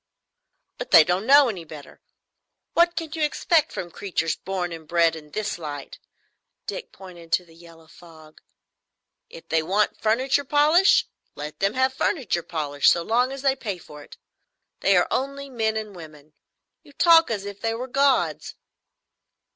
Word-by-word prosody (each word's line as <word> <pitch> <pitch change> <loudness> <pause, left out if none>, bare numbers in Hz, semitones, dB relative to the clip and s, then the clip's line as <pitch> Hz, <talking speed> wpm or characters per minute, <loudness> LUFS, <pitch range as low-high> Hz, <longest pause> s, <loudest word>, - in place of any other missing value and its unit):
"But - - -6
they 160 - +8
don't 180 +6 -1
know 280 0 +7
any 190 -7 -5
better. 150 -2 -13 0.7
What 345 0 +3
can 320 -2 -5
you 320 - -4
expect 305 +1 +1
from 175 -1 -6
creatures 170 -5 -2
born 185 -2 -4
and 160 -2 -9
bred 170 -1 +2
in 150 -2 -12
this 210 +2 -4
light?" 145 -3 -8 0.7
Dick - - -6
pointed 175 -3 -13
to 180 - +2
the 165 - -20
yellow 165 -1 -17
fog. 160 -1 -17 0.9
"If 165 - -13
they 160 0 +2
want 195 +6 0
furniture 255 +6 +1
polish, 300 +7 +4 0.3
let 150 +1 -8
them 195 +3 0
have 260 0 +1
furniture 265 - -1
polish, 145 -4 0
so 170 - +2
long 245 +6 +1
as 275 0 -7
they 270 -1 +2
pay 205 -8 -5
for 150 -3 -13
it. - - -14 0.6
They 195 -1 +3
are 175 - +3
only 275 +1 -3
men 220 -3 -1
and 215 -2 -6
women. 155 -3 -13 0.5
You 290 -3 -19
talk 330 +1 +5
as 205 -3 -3
if 200 0 -8
they 225 0 -1
were 250 +3 -5
gods." 275 +1 0
195 Hz, 165 wpm, -24 LUFS, 165-270 Hz, 0.9 s, they